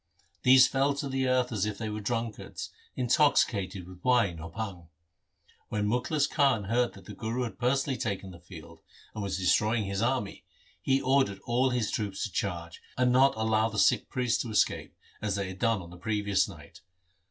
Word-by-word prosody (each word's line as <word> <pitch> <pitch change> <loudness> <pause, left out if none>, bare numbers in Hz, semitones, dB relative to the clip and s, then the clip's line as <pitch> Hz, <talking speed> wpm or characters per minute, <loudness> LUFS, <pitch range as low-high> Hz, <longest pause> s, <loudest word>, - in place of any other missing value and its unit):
These 130 0 +7
fell 140 +1 +1
to 140 0 -3
the 135 -1 -1
earth 125 -1 +2
as 105 -2 0
if 105 -2 -4
they 110 - -4
were 105 0 -4
drunkards 115 0 -4 0.2
intoxicated 115 - +2
with 90 -1 -13
wine 115 -10 +2
or 85 +1 -7
bhang. 90 -3 -6 0.8
When 105 -1 -1
Mukhlis 125 +6 +1
Khan 135 -8 +2
heard 120 +4 +1
that - - -14
the 105 - -9
Guru 115 +4 -3
had 115 - -6
personally 130 +1 0
taken 100 -3 -3
the 85 - -12
field, 85 -2 -13 0.3
and 110 - -5
was 95 -2 -2
destroying 105 +5 +2
his 100 0 -2
army, 120 -4 -1 0.4
he 135 0 +2
ordered 130 -8 +2
all 125 +3 +2
his 125 -3 -1
troops 100 -2 -3
to 105 - -3
charge, 85 -4 -4 0.2
and 125 -1 +3
not 135 +2 +5
allow 110 0 +2
the 105 - -7
Sikh - - +3
priest 125 -2 0
to 120 - -5
escape, 105 - 0 0.3
as 105 -3 -1
they 100 -2 -2
had 95 0 -9
done 115 -5 +1
on 85 - -12
the 90 - -11
previous 100 +1 0
night. - - -13
110 Hz, 190 wpm, -29 LUFS, 100-125 Hz, 0.8 s, These